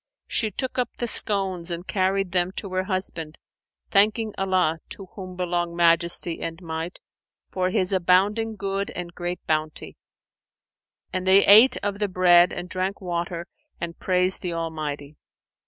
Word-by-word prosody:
She 220 - -1
took 255 +5 -4
up 250 - 0
the 240 - -2
scones 195 -6 +1
and 170 +1 -5
carried 190 -1 0
them 180 0 +1
to 195 -2 -7
her 185 0 -1
husband, 180 -5 -4 0.5
thanking 215 +2 +3
Allah 185 -4 0
(to 195 - -8
whom 185 -2 -8
belong 175 -1 -2
Majesty 170 0 +2
and 165 0 -5
Might!) 165 0 -5 0.5
for 185 -1 0
His 185 +1 0
abounding 200 +5 +2
good 195 0 -3
and 175 -1 -6
great 175 0 -5
bounty; 155 -1 -3 1.2
and 185 0 -3
they 195 +1 +6
ate 225 +6 +7
of 200 0 -2
the 205 - 0
bread 180 -2 +5
and 175 0 -6
drank 185 +2 -3
water 175 -1 -4 0.3
and 170 -1 -6
praised 185 0 +3
the 175 -2 -3
Almighty. 155 -3 -5
185 Hz, 150 wpm, -24 LUFS, 170-195 Hz, 1.2 s, ate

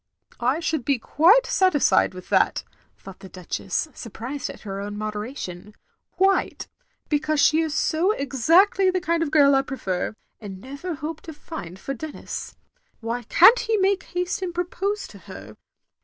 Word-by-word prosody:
" - - -28
I - - -3
shotdd 320 -4 -2
be 275 +2 +1
quite 355 - +4
satisfied 295 - +3
with 185 - -10
that,' - - +2 0.2
' - - -38
thought 195 -1 -12
the 190 - -11
Duchess, 185 - -3
surprised 245 +5 -6
at - - -10
her 195 -2 -6
own 205 +1 -6
moderation, 210 -2 -6 0.4
"qtiite 385 0 +2 0.2
— - - -44
^because 305 +1 +1
she 315 +2 +4
is 320 -2 -2
so 330 +5 +1
exactly 340 - +3
the 370 0 0
kind 335 -2 0
of 325 - 0
giri 285 -2 +5
I 270 - +4
prefer, 215 -9 -3 0.2
and 195 -3 -8
never 280 - -6
hoped 305 +2 -6
to 320 - -7
find, 240 - -8
for 270 +8 -5
Denis. 300 +4 -7 0.4
Why 230 +1 -3
can't 370 - +6
he 450 -1 0
make 390 0 +2
haste 360 +1 -3
and 355 -2 -4
propose 385 +4 -2
to - - -13
her? - - -11
290 Hz, 170 wpm, -24 LUFS, 220-355 Hz, 0.4 s, can't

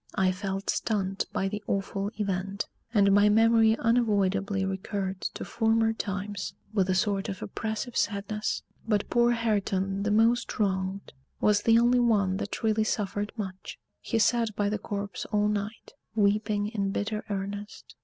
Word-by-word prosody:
I 190 -2 +3
felt 195 +1 -2
stunned 195 -3 -1
by 195 - 0
the 210 +1 -4
awful 195 0 -1
event; 195 -1 -2 0.3
and 200 -3 +4
my 205 +1 +6
memory 225 +1 +5
unavoidably 200 -4 +1
recurred 190 0 -3
to - - -4
former 225 -1 +2
times 200 -2 -4 0.2
with 195 -3 +2
a 185 - +2
sort 195 +1 0
of 190 -2 -5
oppressive 220 +4 -4
sadness. 210 +1 -1 0.2
But 210 -2 0
poor 240 0 +4
Hareton, 200 -4 0
the 210 - 0
most 225 +3 +2
wronged, 190 -1 -1 0.3
was 210 -1 +3
the 225 +1 +5
only 240 +1 +4
one 205 -6 +2
that 205 +3 -5
really 220 0 +2
suffered 205 -1 -2
much. 190 -3 -6 0.2
He 230 - -2
sat 230 -1 +2
by 205 -1 +1
the 210 0 -2
corpse 200 -1 -4
all 210 -1 +1
night, 210 +1 -3 0.2
weeping 210 0 +1
in 200 -3 -1
bitter 210 +2 -2
earnest. 200 +1 -5
205 Hz, 155 wpm, -28 LUFS, 195-220 Hz, 0.3 s, my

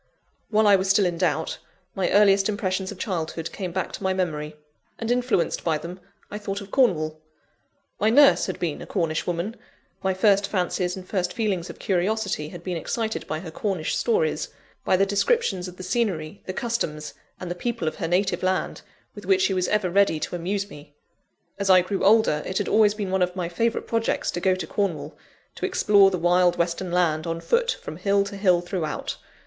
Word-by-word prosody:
While 215 0 +3
I 205 -1 +7
was 190 0 -2
still 195 0 +4
in 175 -2 -1
doubt, 160 -3 0 0.3
my 190 - 0
earliest 200 -1 +4
impressions 190 -2 -2
of 205 - -9
childhood 165 -4 -3
came 185 -3 -5
back 185 +1 -2
to - - -7
my 190 -1 0
memory; 155 -5 -2 0.4
and 230 +1 -2
influenced 245 -7 0
by 160 -2 +1
them, 170 +4 -8 0.3
I 210 - -5
thought 200 -1 -4
of 200 -1 -11
Cornwall. 155 - +1 0.8
My 215 - +3
nurse 280 +4 +6
had 185 - -4
been 165 -4 -2
a - - -8
Cornish 165 -5 -1
woman; 175 +6 -2 0.5
my 190 -1 0
first 200 0 +3
fancies 180 -2 -1
and 185 -1 -9
first 180 -3 -1
feelings 195 -6 -1
of - - -9
curiosity 195 -4 -1
had 175 0 -10
been 180 -2 -3
excited 220 +6 -3
by 155 0 -3
her 170 -3 -8
Cornish 180 -2 -2
stories, 470 0 0 0.3
by 185 - +3
the 195 - +3
descriptions 200 - +1
of 180 0 -10
the 185 - -8
scenery, 185 -4 -2
the - - -2
customs, 185 - -3 0.3
and 180 -1 -5
the - - 0
people 225 -1 -3
of 155 - -2
her 170 - -2
native 190 +3 +1
land, 185 0 -1 0.3
with - - -11
which 385 -1 +4
she 195 - +2
was 185 -1 0
ever 205 -4 +1
ready 195 -4 +3
to - - -3
amuse 195 +4 -2
me. 145 -5 -14 0.6
As 200 -1 -1
I 185 -1 +7
grew 195 +2 -3
older, 205 -7 +4
it 185 - -2
had - - -1
always 210 -1 +4
been 200 -3 -3
one 190 0 +1
of 180 0 +1
my 175 -2 -2
favourite 230 +7 -1
projects 230 -1 0
to - - -3
go 185 +1 +2
to 185 -3 -4
Cornwall, 195 0 -2 0.4
to - - -4
explore 200 -2 +5
the 185 - -2
wild 175 +1 +3
western 170 +1 -1
land, 170 -2 +1
on 165 0 -2
foot, 470 - +1
from - - -7
hill 200 0 +2
to 200 0 -7
hill 185 -3 +3
throughout. 175 -3 -4
185 Hz, 205 wpm, -24 LUFS, 175-205 Hz, 0.8 s, I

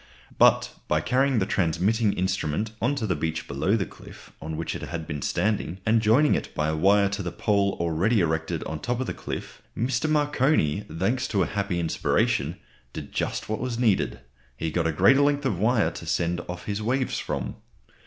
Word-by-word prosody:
But - - +5 0.2
by 75 - +2
carrying 130 - +2
the 95 - +2
transmitting 100 +4 +1
instrument 95 +2 -1
on 125 +5 +1
to 125 -6 -2
the 95 -4 0
beach 80 +1 -3
below 70 +9 +1
the 95 - -1
cliff - - -14
on 80 +1 -5
which 80 - -3
it - - -6
had 85 -1 -5
been 75 -2 -5
standing, 95 0 -1
and 110 0 +3
joining 120 +8 +4
it - - -3
by 75 0 0
a 80 - 0
wire 100 +5 +4
to 100 0 -3
the 90 -2 -4
pole 100 0 +1
already 85 +7 +2
erected 80 -2 -1
on 80 - -4
the - - -13
top 125 0 -1
of 130 - -1
the - - -3
cliff, - - -7 0.2
Mr. 125 +6 0
Marconi, 145 - +2
thanks 105 +11 0
to 100 -3 +1
a - - 0
happy 100 -4 -2
inspiration, 80 -2 0 0.4
did - - -7
just - - -2
what 110 - -2
was 125 -2 -3
needed; 95 - +1 0.4
he 80 +3 -2
got 85 0 0
a - - +1
greater 135 - +5
length 145 0 +2
of 105 -10 0
wire 110 +2 +2
to - - -9
send 85 0 0
off 90 0 -6
his 105 0 -3
waves 130 +4 0
from. - - -4
100 Hz, 205 wpm, -26 LUFS, 80-120 Hz, 0.4 s, But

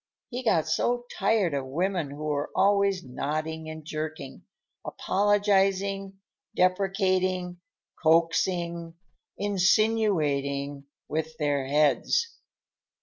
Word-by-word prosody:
He 250 +1 -3
got 165 -9 +2
so 240 +9 0
tired 200 -4 +2
of 135 -2 -2
women 175 +2 -1
who 145 +2 -8
were 150 -1 -1
always 200 -2 +3
nodding 155 +5 -4
and 155 -1 -8
jerking; 155 -3 -6 0.4
apologizing, 195 -1 +1 0.4
deprecating, 185 -1 +1 0.4
coaxing, 170 +1 +1 0.4
insinuating 170 -9 +1 0.2
with 160 0 -3
their 145 -3 0
heads. 150 - +2
170 Hz, 90 wpm, -27 LUFS, 155-195 Hz, 0.4 s, always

